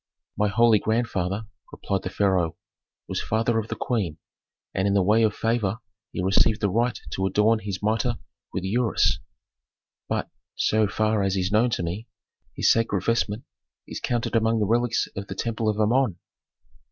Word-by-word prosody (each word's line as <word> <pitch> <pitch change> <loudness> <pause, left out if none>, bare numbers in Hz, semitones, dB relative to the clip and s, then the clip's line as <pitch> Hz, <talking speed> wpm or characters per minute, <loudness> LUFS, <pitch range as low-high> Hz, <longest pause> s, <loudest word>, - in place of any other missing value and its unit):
"My 105 +1 +2
holy 110 +1 +4
grandfather," 110 -3 -1 0.3
replied 95 -2 -2
the 90 - -4
pharaoh, 95 -4 +1 0.5
"was - - -2
father 115 +1 +1
of 110 - -4
the - - -4
queen, 95 -11 -2 0.6
and 95 +1 +1
in 100 - +2
the 100 - +4
way 105 +4 +4
of 110 -2 +2
favor 115 -3 0 0.3
he 90 - -3
received 100 +4 +3
the 100 -3 0
right 120 +3 +1
to 95 +4 0
adorn 105 +4 +3
his 100 -2 -5
mitre 115 +3 +1 0.3
with 95 - -3
the 95 - -2
ureus. 120 -3 +2 0.9
But, - - -2 0.2
so 110 -1 +2
far 110 +1 +1
as 95 0 0
is 95 +1 0
known 110 +4 +4
to - - -3
me, 95 +8 -4 0.5
his - - +4
sacred 110 -5 +1
vestment 115 -1 0 0.4
is - - -6
counted 120 -1 -1
among 115 0 +3
the 105 - +2
relics 120 +2 +1
of 100 0 -5
the 95 - -6
temple 115 +1 -1
of 105 0 -1
Amon." 110 -2 +2
110 Hz, 175 wpm, -25 LUFS, 95-115 Hz, 0.9 s, holy